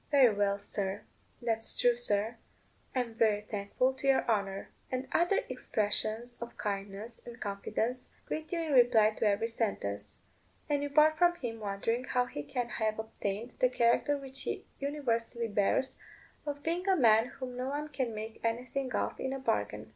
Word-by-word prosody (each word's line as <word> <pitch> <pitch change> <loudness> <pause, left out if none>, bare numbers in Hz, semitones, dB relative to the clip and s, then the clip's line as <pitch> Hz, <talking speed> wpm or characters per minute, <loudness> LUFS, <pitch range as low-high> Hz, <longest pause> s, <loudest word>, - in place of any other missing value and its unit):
"Very 265 -6 +6
well, 200 -1 +2
sir;" 200 -1 -3 0.4
"That's 225 -1 0
true, 245 -1 +4
sir;" 225 -1 0 0.6
"I'm 245 -3 0
very 215 -2 +3
thankful 210 +5 0
to 265 +1 -4
your 270 -1 +4
honour," 200 -3 0 0.2
and 255 +1 -2
other 345 +4 +3
expressions 225 -1 -1
of 235 0 -7
kindness 200 +2 -4
and 240 0 -10
confidence 220 +5 -2 0.2
greet 315 0 -4
you 340 -2 0
in 315 -3 -1
reply 235 -4 +6
to 215 - 0
every 205 +2 +2
sentence; 200 - -2 0.5
and 290 -2 +1
you 285 - -2
part 310 +2 +5
from 350 0 +5
him 235 -8 -5
wondering 215 +4 -1
how 250 -1 +2
he 195 - -5
can 235 - -3
have 220 -2 -1
obtained 220 +1 -4
the 255 - +5
character 250 +4 +3
which 270 -1 -8
he - - -3
universally 235 -5 -1
bears, 210 +5 +1 0.5
of 285 0 -3
being 345 +3 -1
a 380 - +6
man 225 -6 +5
whom 255 -1 -7
no 250 +1 -2
one 290 +2 -2
can 260 -6 -2
make 220 +1 -6
anything 250 +3 -1
of - - -1
in 265 - -2
a - - -2
bargain. 105 - -1
235 Hz, 170 wpm, -32 LUFS, 215-265 Hz, 0.6 s, Very